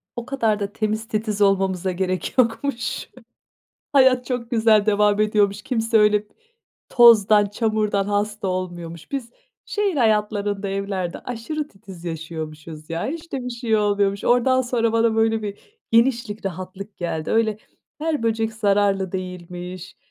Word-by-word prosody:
O 240 Hz, -, -5 dB
kadar 225 Hz, -6 st, 0 dB
da 200 Hz, 0 st, -4 dB
temiz 215 Hz, +1 st, -2 dB
titiz 215 Hz, -1 st, -2 dB
olmamıza 190 Hz, -2 st, +2 dB
gerek 185 Hz, +4 st, -2 dB
yokmuş. 240 Hz, +1 st, 0 dB, 0.8 s
Hayat 260 Hz, -2 st, +5 dB
çok 245 Hz, -2 st, -4 dB
güzel 220 Hz, -3 st, +4 dB
devam 210 Hz, 0 st, +3 dB
ediyormuş, 205 Hz, -1 st, +2 dB
kimse 225 Hz, -2 st, +1 dB
öyle 210 Hz, 0 st, +4 dB, 0.7 s
tozdan, 215 Hz, -4 st, +6 dB
çamurdan 210 Hz, -2 st, 0 dB
hasta 205 Hz, 0 st, -1 dB
olmuyormuş. 175 Hz, -, -5 dB
Biz 255 Hz, -4 st, -4 dB, 0.3 s
şehir 410 Hz, -5 st, -1 dB
hayatlarında, 210 Hz, -3 st, +1 dB
evlerde 195 Hz, -3 st, -3 dB
aşırı 265 Hz, +6 st, -5 dB
titiz 195 Hz, -, -13 dB
yaşıyormuşuz 160 Hz, -1 st, -7 dB
ya, 165 Hz, +6 st, -2 dB
hiç 330 Hz, +3 st, -6 dB
de 260 Hz, -2 st, -2 dB
bir -, -, -3 dB
şey 235 Hz, -2 st, 0 dB
oluyormuş, 200 Hz, -1 st, +1 dB
oradan 255 Hz, +2 st, +3 dB
sonra 230 Hz, -2 st, 0 dB
bana 230 Hz, 0 st, +2 dB
böyle 225 Hz, 0 st, +2 dB
bir 205 Hz, -1 st, -5 dB, 0.3 s
genişlik 230 Hz, -3 st, +2 dB
rahatlık 190 Hz, +2 st, -6 dB
geldi. 160 Hz, -3 st, -3 dB
Öyle 220 Hz, -2 st, +2 dB, 0.4 s
her 310 Hz, -5 st, -1 dB
böcek 225 Hz, 0 st, 0 dB
zararlı 200 Hz, -3 st, +1 dB
değilmiş, 180 Hz, 0 st, -7 dB
210 Hz, 135 wpm, -22 LUFS, 195-230 Hz, 0.8 s, tozdan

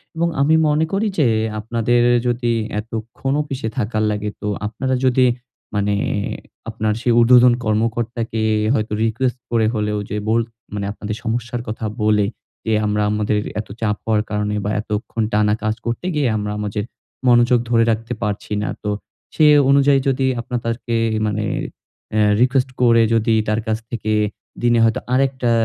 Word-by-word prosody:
এবং 170 Hz, +1 st, +1 dB
আমি 155 Hz, +3 st, +4 dB
মনে 150 Hz, +2 st, +2 dB
করি 210 Hz, +3 st, +1 dB
যে 145 Hz, -, +4 dB, 0.3 s
আপনাদের 115 Hz, +2 st, +1 dB, 0.3 s
যদি 120 Hz, 0 st, 0 dB, 0.3 s
এতক্ষণ 115 Hz, +4 st, -4 dB
অফিসে 135 Hz, -5 st, -4 dB
থাকার 110 Hz, -2 st, 0 dB
লাগে, 105 Hz, 0 st, -2 dB
তো 105 Hz, -, -3 dB, 0.2 s
আপনারা 130 Hz, +4 st, -2 dB
যদি 130 Hz, 0 st, +4 dB, 0.5 s
মানে 100 Hz, 0 st, +1 dB, 0.7 s
আপনার 110 Hz, -1 st, -1 dB
সেই 120 Hz, -1 st, +2 dB
ঊর্ধ্বতন 125 Hz, +1 st, +6 dB
কর্মকর্তাকে 115 Hz, +1 st, -1 dB, 0.3 s
হয়তো 105 Hz, -2 st, -1 dB
রিকোয়েস্ট 120 Hz, +3 st, 0 dB
করে 115 Hz, -2 st, +2 dB
হলেও 105 Hz, -1 st, -1 dB
যে 105 Hz, -, -2 dB
বোল 115 Hz, +1 st, +3 dB, 0.3 s
মানে 100 Hz, -1 st, -3 dB
আপনাদের 105 Hz, +1 st, -5 dB
সমস্যার 120 Hz, +1 st, -2 dB
কথা 110 Hz, 0 st, -4 dB, 0.2 s
বলে 105 Hz, -1 st, +3 dB, 0.4 s
যে 110 Hz, -, +1 dB
আমরা 105 Hz, 0 st, 0 dB
আমাদের 105 Hz, 0 st, 0 dB, 0.2 s
এত 105 Hz, -, -5 dB
চাপ 105 Hz, -2 st, +1 dB
হওয়ার 110 Hz, -1 st, +2 dB
কারণে 105 Hz, 0 st, -1 dB
বা 105 Hz, -, 0 dB
এতক্ষণ 110 Hz, +1 st, -3 dB
টানা 105 Hz, 0 st, +3 dB
কাজ 110 Hz, 0 st, 0 dB
করতে 115 Hz, +9 st, -3 dB
গিয়ে 145 Hz, -3 st, +2 dB
আমরা 105 Hz, 0 st, -3 dB
আমাদের 105 Hz, 0 st, -2 dB, 0.4 s
মনোযোগ 120 Hz, 0 st, +5 dB
ধরে 115 Hz, -1 st, +4 dB
রাখতে 115 Hz, +2 st, -3 dB
পারছি 105 Hz, 0 st, -3 dB
না। -, -, -2 dB
তো 105 Hz, -, -1 dB, 0.5 s
সেই 150 Hz, -1 st, +6 dB, 0.2 s
অনুযায়ী 140 Hz, 0 st, +5 dB
যদি 135 Hz, 0 st, 0 dB
আপনারা 120 Hz, 0 st, -3 dB
তাঁকে 115 Hz, 0 st, -2 dB, 0.3 s
মানে 105 Hz, 0 st, -1 dB, 0.7 s
অ্যা 110 Hz, 0 st, +2 dB, 0.2 s
রিকোয়েস্ট 130 Hz, +1 st, +2 dB
করে 115 Hz, -1 st, +5 dB
যদি 115 Hz, 0 st, +2 dB
তার 110 Hz, +1 st, +1 dB
কাছ 110 Hz, -, +1 dB
থেকে 110 Hz, -2 st, -2 dB, 0.5 s
দিনে 120 Hz, -1 st, +4 dB
হয়তো 115 Hz, -1 st, +2 dB
আরেকটা 130 Hz, -2 st, +1 dB
115 Hz, 155 wpm, -20 LUFS, 105-125 Hz, 0.7 s, ঊর্ধ্বতন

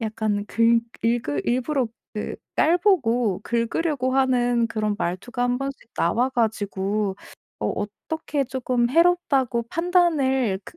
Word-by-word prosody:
약간 215 Hz, -2 st, -1 dB
긁 230 Hz, +1 st, +3 dB, 0.2 s
일그 230 Hz, -, 0 dB
일부러 255 Hz, +1 st, 0 dB, 0.3 s
그 210 Hz, -, -4 dB, 0.2 s
깔보고 260 Hz, -, +2 dB
긁으려고 255 Hz, +3 st, -1 dB
하는 245 Hz, -3 st, +2 dB
그런 215 Hz, -2 st, -1 dB
말투가 195 Hz, +8 st, -3 dB
1 245 Hz, 0 st, +1 dB
번씩 275 Hz, -3 st, -6 dB
나와 235 Hz, +10 st, +1 dB
가지고 205 Hz, -4 st, -1 dB, 0.4 s
어 -, -, 0 dB
어떻게 280 Hz, +8 st, -3 dB
쪼끔 250 Hz, -2 st, 0 dB
해롭다고 285 Hz, -7 st, +2 dB
판단을 290 Hz, -, +2 dB
그 -, -, -13 dB
245 Hz, 245 characters per minute, -24 LUFS, 220-275 Hz, 0.4 s, 긁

